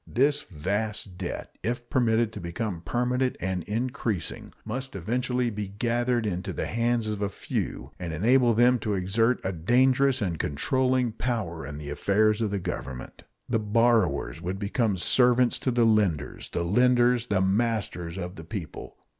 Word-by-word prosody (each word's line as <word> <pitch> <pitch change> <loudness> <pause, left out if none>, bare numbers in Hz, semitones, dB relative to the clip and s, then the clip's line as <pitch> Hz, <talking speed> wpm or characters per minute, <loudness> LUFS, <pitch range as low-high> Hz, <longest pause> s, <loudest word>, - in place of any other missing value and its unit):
This 145 +4 +2
vast 100 - -3
debt, 90 - -5
if 120 +1 -3
permitted 115 -3 +2
to - - -6
become 85 +1 -4
permanent 125 +4 0
and 95 0 -2
increasing, 115 -4 -3
must 130 +3 -4
eventually 125 +5 -1
be 105 -1 -4
gathered 120 +3 0
into 90 -3 -3
the - - -2
hands 115 0 0
of 105 -1 -3
a 100 - 0
few, 70 -7 -4
and 90 -2 -4
enable 120 - +3
them 120 +2 +5
to 105 -3 -1
exert 115 +6 +1
a 95 - -1
dangerous 130 - +3
and 90 -7 -2
controlling 125 - +1
power 105 - -3
in 75 0 -7
the 75 -1 -6
affairs 105 +7 +2
of 110 - +1
the 100 - -1
Government. 70 -8 -6 0.2
The 115 - +1
borrowers 110 - +2
would 90 +2 -3
become 100 0 0
servants 125 +5 +3
to - - -1
the 120 -1 +3
lenders, 100 -10 +1
the 85 - -2
lenders 120 +4 +3
the 100 -2 +1
masters 95 -4 0
of 90 -1 -5
the 80 - -8
people. 85 -2 -7
110 Hz, 160 wpm, -27 LUFS, 95-120 Hz, 0.2 s, them